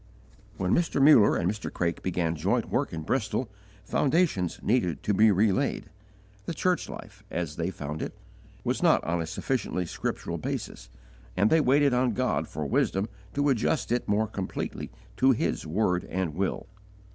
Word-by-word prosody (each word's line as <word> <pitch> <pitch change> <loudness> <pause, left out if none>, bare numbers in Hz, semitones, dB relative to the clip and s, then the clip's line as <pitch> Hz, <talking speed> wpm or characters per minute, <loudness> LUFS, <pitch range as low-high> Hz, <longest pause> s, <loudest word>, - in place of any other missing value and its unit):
When 95 -1 0
Mr. 170 -4 +1
Muller 135 -7 +7
and 85 - 0
Mr. 105 +2 -3
Craik 85 -1 -2
began 85 -3 -1
joint 75 - 0
work - - 0
in 80 -1 -5
Bristol, 110 +3 -1 0.3
foundations 140 - +1
needed 100 - +1
to 105 - +1
be 110 +3 +5
relaid. 100 -4 +1 0.6
The 165 - -3
church 180 +3 0
life, 105 0 -10
as 85 -4 -3
they 85 +1 -1
found 75 -3 -5
it, - - -5 0.5
was - - -1
not - - +4
on 85 +1 -1
a 80 - -4
sufficiently 95 -4 -2
scriptural - - -4
basis, - - -5 0.5
and 105 +2 +3
they 160 - +5
waited 140 0 +4
on 125 -1 +2
God - - 0
for 75 +1 -5
wisdom 95 +8 0 0.3
to 145 +1 +2
adjust 130 +2 0
it 120 - 0
more 105 +2 +2
completely 100 -3 -5 0.3
to 130 0 +5
His 110 - -2
word 90 +1 +1
and 95 -4 -2
will. 95 +4 -2
100 Hz, 165 wpm, -27 LUFS, 85-125 Hz, 0.6 s, Muller